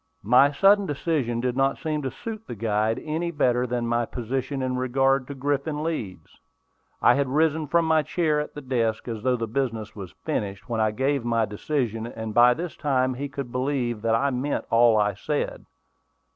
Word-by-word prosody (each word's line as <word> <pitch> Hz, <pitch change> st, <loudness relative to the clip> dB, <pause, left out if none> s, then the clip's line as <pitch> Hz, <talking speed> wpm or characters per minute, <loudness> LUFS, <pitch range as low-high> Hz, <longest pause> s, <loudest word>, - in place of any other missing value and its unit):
My 125 Hz, +7 st, +5 dB
sudden 195 Hz, +5 st, +4 dB
decision 140 Hz, -6 st, -1 dB
did 125 Hz, 0 st, -1 dB
not 135 Hz, +1 st, +1 dB
seem 155 Hz, -2 st, -2 dB
to 135 Hz, -, -2 dB
suit 220 Hz, -, -8 dB
the 120 Hz, -, -6 dB
guide 110 Hz, +1 st, 0 dB
any 160 Hz, +3 st, -2 dB
better 125 Hz, -6 st, +1 dB
than 120 Hz, -1 st, -2 dB
my 120 Hz, 0 st, 0 dB
position 130 Hz, +3 st, -3 dB
in 130 Hz, 0 st, -1 dB
regard 130 Hz, +1 st, +1 dB
to 140 Hz, -, -6 dB
Griffin 145 Hz, +2 st, -1 dB
Leeds. 105 Hz, -, -5 dB, 0.6 s
I -, -, +7 dB
had 140 Hz, -1 st, +1 dB
risen 155 Hz, +2 st, +1 dB
from 170 Hz, +3 st, +2 dB
my 160 Hz, -1 st, +3 dB
chair 155 Hz, -1 st, 0 dB
at 150 Hz, -, -5 dB
the 145 Hz, -, -6 dB
desk, 120 Hz, -5 st, -1 dB
as 115 Hz, -3 st, -4 dB
though 125 Hz, +2 st, +2 dB
the 115 Hz, -, -2 dB
business 115 Hz, -3 st, -3 dB
was 95 Hz, -4 st, -9 dB
finished, 100 Hz, -1 st, -3 dB
when 115 Hz, -2 st, -1 dB
I 110 Hz, -, +3 dB
gave 135 Hz, +4 st, 0 dB
my 115 Hz, -1 st, +1 dB
decision; 115 Hz, +1 st, -2 dB
and 110 Hz, -2 st, -6 dB
by 120 Hz, +1 st, +6 dB
this 170 Hz, 0 st, -5 dB
time 130 Hz, -3 st, +1 dB
he 140 Hz, +3 st, -5 dB
could 135 Hz, -3 st, -6 dB
believe 125 Hz, -3 st, -1 dB
that 115 Hz, 0 st, +2 dB
I 140 Hz, +4 st, +1 dB
meant 135 Hz, +3 st, -2 dB
all 115 Hz, -1 st, +5 dB
I 105 Hz, -1 st, +2 dB
said. -, -, -3 dB
130 Hz, 195 wpm, -25 LUFS, 115-145 Hz, 0.6 s, I